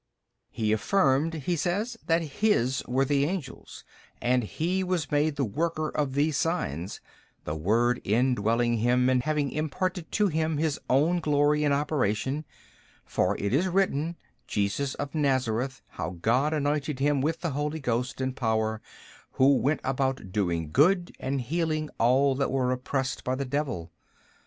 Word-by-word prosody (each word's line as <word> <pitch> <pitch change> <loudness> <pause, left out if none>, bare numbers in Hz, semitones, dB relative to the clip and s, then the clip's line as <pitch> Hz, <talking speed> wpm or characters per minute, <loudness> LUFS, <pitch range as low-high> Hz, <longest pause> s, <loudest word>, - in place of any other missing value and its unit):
B. 115 - -5
He 105 - +2
affirmed 150 - +2
(he 160 +3 -1
says) 200 +9 -1
that 165 0 +3
His 140 - +1
were 130 +2 +2
the 140 0 +2
angels, 165 -6 -6 0.4
and 125 +1 +2
He 175 - -1
was 180 -5 -2
made 150 +1 +2
the 140 -2 0
worker 155 +6 -1
of 145 -3 -1
these 145 0 +2
signs, 95 - -2 0.4
the 75 - -3
Word 115 +10 +1
indwelling 120 +1 +2
Him 125 +3 +3
and 125 -1 +3
having 150 -1 0
imparted 170 +3 -2
to 210 - +3
Him 160 -3 0
His 155 -1 0
own 155 +7 +3
glory 150 -1 +2
and 145 - +2
operation: 140 -1 0 0.6
for - - 0
it 100 +2 -2
is 170 +8 +3
written, 170 -4 0 0.3
Jesus 105 +7 -1
of 140 - -5
Nazareth 130 -3 0
how 85 +3 -5
God 125 - +2
anointed 150 -1 -1
Him 140 0 +2
with 160 +3 -1
the 170 -3 -1
Holy 150 +3 -2
Ghost 125 -1 -2
and 130 0 -2
power, 110 -2 0 0.5
Who 135 +1 +5
went 145 +4 0
about 135 -6 -1
doing 85 -6 -1
good 175 - +3
and 135 0 -2
healing 155 +3 -1
all 130 +4 +4
that 140 - 0
are 130 -1 +1
oppressed 130 +1 -2
by 130 - -1
the 140 +1 -3
devil. 125 - -3
140 Hz, 155 wpm, -27 LUFS, 125-155 Hz, 0.6 s, Who